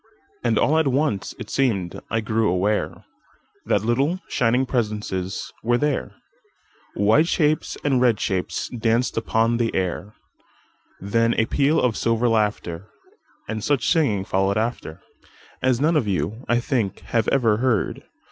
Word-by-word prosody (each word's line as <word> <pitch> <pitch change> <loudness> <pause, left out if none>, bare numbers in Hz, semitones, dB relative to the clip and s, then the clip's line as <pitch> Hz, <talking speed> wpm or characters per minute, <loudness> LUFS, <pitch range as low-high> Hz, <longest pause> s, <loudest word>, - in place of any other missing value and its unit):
And - - +1
all 155 +2 +3
at 160 - +2
once 135 -6 0
it - - -8
seem'd 100 -10 0
I 115 - 0
grew 110 -1 +1
awareThat 100 +1 -3
little, 140 +10 +1
shining 125 +2 +1
presences 105 -6 -3
were 120 +2 +2
there,—White 135 - -2
shapes 155 -3 0
and 135 -4 +2
red 120 -4 +3
shapes 95 -2 -2
danced 115 +1 0
upon 115 +1 +1
the 115 -1 -1
air; 95 +2 -2 0.8
Then 115 +4 +1
a 110 - +2
peal 145 +6 +2
of 120 -4 +1
silver 115 +1 +1
laughter, 105 -5 -1 0.6
And 110 -1 -4
such 140 -5 +1
singing 115 - +2
followed 95 +2 +1
afterAs 120 +3 -4
none 160 +4 +2
of 135 -8 +1
you, 105 +5 -2
I 120 0 +3
think, 120 -7 -1
have 115 -2 -1
ever 115 -6 +3
heard. 120 -3 0
115 Hz, 135 wpm, -23 LUFS, 105-130 Hz, 0.8 s, all